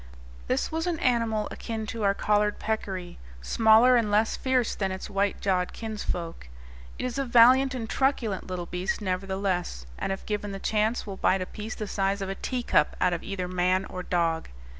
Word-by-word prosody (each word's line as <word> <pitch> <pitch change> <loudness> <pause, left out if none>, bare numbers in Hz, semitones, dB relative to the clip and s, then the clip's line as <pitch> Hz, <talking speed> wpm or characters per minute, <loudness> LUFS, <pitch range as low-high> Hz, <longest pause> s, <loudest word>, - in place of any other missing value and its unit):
This - - 0
was 325 +2 -2
an 345 -2 0
animal 230 -5 +1
akin 225 -1 -5
to 225 - -5
our 200 -1 +2
collared 210 0 +1
peccary, 190 -5 -4 0.2
smaller 220 - +5
and 230 -3 +2
less 215 +2 +2
fierce 255 -3 +1
than 195 -2 -2
its 190 +2 -6
white 200 0 0
jawed 185 -2 0
kinsfolk. 180 - -5 0.5
It - - -3
is 255 +1 -3
a - - +1
valiant 255 +2 +6
and 230 -3 -4
truculent 235 -7 0
little 180 -2 -4
beast, 180 +2 -2
nevertheless, 190 - -2
and - - -2
if 195 - -4
given 210 -1 -3
the 195 - -5
chance 220 +3 0
will 195 -2 -6
bite 190 0 +2
a - - -5
piece 215 +3 -7
the 215 - -4
size 195 0 -1
of 190 - -4
a - - -1
teacup 240 - 0
out 180 -1 +2
of 170 - -2
either 190 -2 -4
man 185 +1 +1
or 185 - -6
dog. 170 -2 0
205 Hz, 190 wpm, -27 LUFS, 185-225 Hz, 0.5 s, valiant